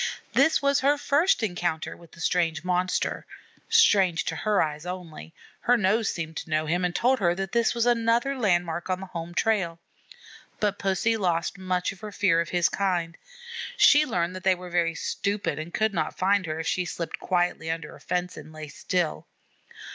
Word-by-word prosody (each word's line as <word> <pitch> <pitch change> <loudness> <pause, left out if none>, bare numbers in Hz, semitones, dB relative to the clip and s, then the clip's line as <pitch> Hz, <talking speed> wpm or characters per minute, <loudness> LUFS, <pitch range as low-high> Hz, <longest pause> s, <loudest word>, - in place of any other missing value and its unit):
This 320 - +3
was 280 0 +3
her 285 +2 +3
first 290 0 +2
encounter 175 -5 -2
with 170 -2 -18
the 170 - -12
strange 165 -2 0
monster, 180 0 -1 0.5
strange 195 - +4
to - - -2
her 210 -2 +1
eyes 150 -1 -1
only; 180 -3 -7 0.3
her 245 +1 +3
nose 215 +1 +2
seemed 160 -1 -5
to - - -6
know 155 0 +1
him 175 +4 0
and 180 0 -1
told 255 +1 +2
her 175 -3 +2
this 195 +6 0
was 235 0 +1
another 235 +3 +2
landmark 175 -7 0
on 185 0 0
the 190 - -6
home 175 -1 -7
trail. 190 -7 +1 0.8
But 205 -1 0
Pussy 195 +4 +1
lost 175 -2 -1
much 185 0 -1
of 195 - -13
her 215 0 -7
fear 185 -5 +2
of 170 - -4
his 175 -1 +2
kind. 175 -4 -1 0.6
She 300 -10 +7
learned 180 - -1
that 185 - -8
they 190 -1 +4
were 180 0 -10
very 170 -1 +1
stupid 200 -5 -2
and 160 +2 -6
could 220 +2 0
not - - -2
find 195 0 +2
her 155 0 -3
if 160 - -4
she 180 +1 0
slipped 170 -1 -5
quietly 175 -3 0
under 165 -2 -4
a - - -15
fence 180 0 -3
and 155 - -10
lay 155 -1 -8
still. 175 +1 -2
180 Hz, 190 wpm, -26 LUFS, 170-210 Hz, 0.8 s, She